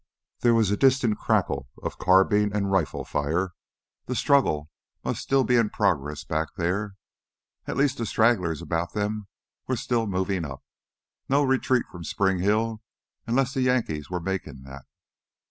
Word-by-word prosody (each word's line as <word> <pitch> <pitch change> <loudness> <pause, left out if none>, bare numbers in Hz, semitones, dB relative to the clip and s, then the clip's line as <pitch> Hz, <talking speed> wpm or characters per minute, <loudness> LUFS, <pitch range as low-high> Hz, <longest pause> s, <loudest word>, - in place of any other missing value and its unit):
There 120 -1 +4
was 110 -3 +3
a 105 - +1
distant 130 -5 +3
crackle 60 - 0
of - - -5
carbine 100 +3 +4
and 100 -1 0
rifle 95 -6 0
fire. 85 +6 -1 0.5
The 125 - -2
struggle 80 - +2 0.3
must - - -2
still 135 -1 +2
be 125 -1 +3
in 115 -3 +3
progress 75 -9 0
back 80 0 -3
there. 95 +3 -1 0.7
At - - -3
least 140 -2 +2
the 115 - -2
stragglers 95 -10 +2
about 85 0 -2
them 105 0 -2 0.4
were - - 0
still 115 -2 0
moving 95 -1 -1
up. 70 -3 -7 0.7
No 140 +2 +4
retreat 130 -1 +2
from 85 -1 -9
Spring 95 +1 0
Hill, 110 +3 +1 0.5
unless 135 +3 +1
the 135 - 0
Yankees 115 - 0
were 90 -1 -2
making 95 -7 -4
that. 65 +1 -11
100 Hz, 155 wpm, -26 LUFS, 85-120 Hz, 0.7 s, There